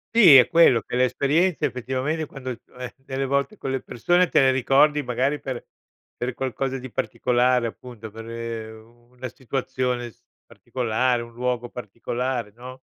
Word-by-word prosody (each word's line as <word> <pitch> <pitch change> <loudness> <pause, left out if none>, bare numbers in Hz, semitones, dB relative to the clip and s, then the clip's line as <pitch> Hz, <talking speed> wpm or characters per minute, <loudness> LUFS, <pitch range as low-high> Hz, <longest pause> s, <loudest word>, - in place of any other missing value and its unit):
Sì, 175 -12 +9
è 125 - +7
quello, 165 -9 +5
che 110 - -6
le 125 - +3
esperienze 150 +8 +1
effettivamente 130 +5 -2
quando, 135 -3 -7 0.3
eh, 125 -1 -6
delle 135 0 -4
volte 140 +10 -1
con 135 - -4
le 135 - -2
persone 175 +8 +1
te - - +4
ne 135 -1 +5
ricordi 140 +3 +3
magari 130 +4 0
per 130 -3 -5 0.5
per 125 0 -3
qualcosa 135 +1 -3
di 130 +1 -8
particolare 125 +1 +1
appunto, 115 -1 -9
per, 110 +2 -10
ehm, 115 0 -8
una 125 +1 -7
situazione 125 0 -3
s 105 - -22 0.3
particolare, 125 0 -1
un 120 - -9
luogo 125 0 -2
particolare, 120 +1 -4
no? 130 +2 -10
125 Hz, 160 wpm, -24 LUFS, 120-135 Hz, 0.5 s, Sì